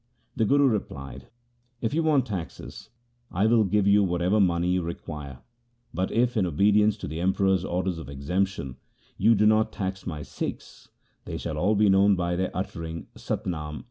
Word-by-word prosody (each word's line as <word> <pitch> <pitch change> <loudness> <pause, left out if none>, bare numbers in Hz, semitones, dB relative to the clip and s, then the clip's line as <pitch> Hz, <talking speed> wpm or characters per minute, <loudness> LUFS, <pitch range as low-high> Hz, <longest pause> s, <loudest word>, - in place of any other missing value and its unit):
The 115 - +1
Guru 140 +4 +4
replied, 80 - -4 0.5
If 115 +1 -2
you 165 - +2
want 150 -5 +3
taxes, 95 -8 -7 0.4
I 95 +4 0
will 110 0 +4
give 105 0 +1
you 100 0 +5
whatever 90 +3 +1
money 85 -3 +2
you 90 0 +1
require; 75 -5 -7 0.5
bat 90 +3 -1
if, 120 +1 +1
in 100 -5 +2
obedience 105 +5 +3
to - - -6
the 80 +4 -5
Emperor's 95 0 +2
order 95 0 -1
of 80 -5 -8
exemption, 70 0 -2 0.4
you 115 - +4
do 105 +1 +3
not 110 0 +3
tax 95 -1 -4
my 75 -4 -4
Sikhs, 65 - -7 0.4
they - - -5
shall 75 -2 -4
all 105 +6 +2
be 105 +1 +4
known 100 +1 +5
by 90 -1 -1
their 95 +1 -1
uttering 85 -3 -5
" - - -39
Sat - - -4
Nam 75 -4 -4
95 Hz, 180 wpm, -26 LUFS, 85-105 Hz, 0.5 s, you